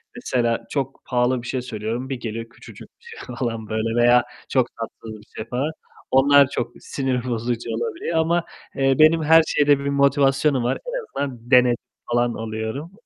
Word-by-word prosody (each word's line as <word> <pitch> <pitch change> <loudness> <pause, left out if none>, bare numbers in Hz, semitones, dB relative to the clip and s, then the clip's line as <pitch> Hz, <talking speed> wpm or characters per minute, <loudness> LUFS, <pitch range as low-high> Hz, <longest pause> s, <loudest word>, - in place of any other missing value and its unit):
mesela 120 - -1
çok 135 -2 -3
pahalı 125 0 +1
bir 120 - -9
şey 130 -2 -2
söylüyorum. 115 +2 -4
Bir 135 - -2
geliyor 115 0 -5
küçücük - - -13
bir - - -30
şey 450 - -9
falan 115 -4 -3
böyle 110 +1 -1
veya 120 0 +5 0.3
çok - - +2
tatsız 110 -1 -8
bir - - -18
şey 110 - -4
falan, 135 +6 -1 0.4
onlar 140 +1 +6
çok - - -3
sinir 130 -3 -2
bozucu 120 0 -2
olabiliyor 120 +8 -2
ama, 170 +1 +2 0.3
eee, 135 -1 +2
benim 160 +1 +5
her 160 +1 +6
şeyde 145 -1 +3
bir 140 - -6
motivasyonum 140 -1 +2
var. 125 - 0
En - - -4 0.2
azından 125 -2 -7
dene 125 -1 +6 0.4
falan 120 0 +1
oluyorum. 110 +8 -5
125 Hz, 170 wpm, -22 LUFS, 115-140 Hz, 0.4 s, onlar